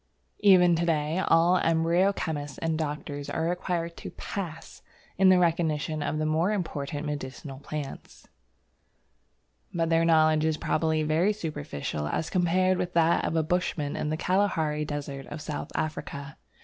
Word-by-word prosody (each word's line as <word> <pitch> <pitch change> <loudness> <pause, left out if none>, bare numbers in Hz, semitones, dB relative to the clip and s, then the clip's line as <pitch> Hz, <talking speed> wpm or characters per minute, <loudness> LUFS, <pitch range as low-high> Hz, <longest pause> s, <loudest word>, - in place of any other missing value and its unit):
Even 180 -4 +6
to 170 - 0
day 155 +1 +1
all 170 +2 +5
embryo 165 +3 +3
chemists 145 -7 -4
and 165 -1 -1
doctors 150 -1 -4
are 160 - -2
required 170 -1 -2
to - - -7
"pass" 175 -6 -7 0.4
in 190 -1 +6
the 185 - +6
recognition 160 -3 +1
of 155 - -1
the 155 - -1
more 160 +5 +1
important 150 -6 -3
medicinal 135 -1 -6
plants. 145 -1 -7 1.4
But 165 -1 -1
their 165 0 +4
knowledge 155 -2 +4
is 160 -1 +1
probably 160 -1 0
very 165 +7 +2
superficial 75 - -4
as 160 - -2
compared 185 +1 +2
with 180 0 -2
that 165 0 +3
of - - -1
a 160 - +2
bushman 155 -3 -1
in 150 - -2
the 155 - -1
Kalahari 160 -5 +1
Desert 140 -2 -5
of 150 - -7
South 150 -1 -5
Africa. 140 -3 -4
160 Hz, 150 wpm, -27 LUFS, 150-175 Hz, 1.4 s, Even